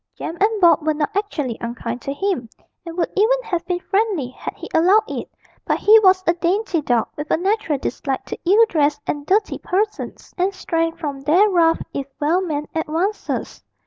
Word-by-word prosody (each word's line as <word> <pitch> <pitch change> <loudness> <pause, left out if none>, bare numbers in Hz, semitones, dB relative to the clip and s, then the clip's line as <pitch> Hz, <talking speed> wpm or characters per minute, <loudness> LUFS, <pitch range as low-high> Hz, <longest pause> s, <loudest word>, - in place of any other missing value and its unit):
Jem 325 - -5
and 430 +1 +2
Bob 345 -1 +6
were 310 0 0
not 300 +4 -2
actually 300 - -2
unkind 235 0 -4
to 275 - -4
him, 285 - -2 0.4
and 335 +1 -7
would 345 - 0
even - - +3
have 350 -6 -2
been 355 -1 -1
friendly 390 - 0
had 255 - -7
he - - -8
allowed 375 +7 +5
it; - - -5 0.3
but - - 0
he 440 +1 +7
was 375 -2 +4
a 340 - +4
dainty 350 0 0
dog, 245 -5 +1
with 295 +1 -6
a - - +3
natural 380 -4 0
dislike 270 0 -3
to - - -6
ill 440 +4 +6
dressed 295 -5 +1
and 290 0 -4
dirty 410 +2 +1
persons, 420 +3 -3
and 380 +2 +1
shrank 330 -2 -1
from 285 -4 -5
their 345 +9 +4
rough 330 -2 +3
if 275 -1 -4
well 320 +5 +2
meant 300 -5 -3
advances. 330 +6 -2
340 Hz, 190 wpm, -21 LUFS, 295-395 Hz, 0.4 s, he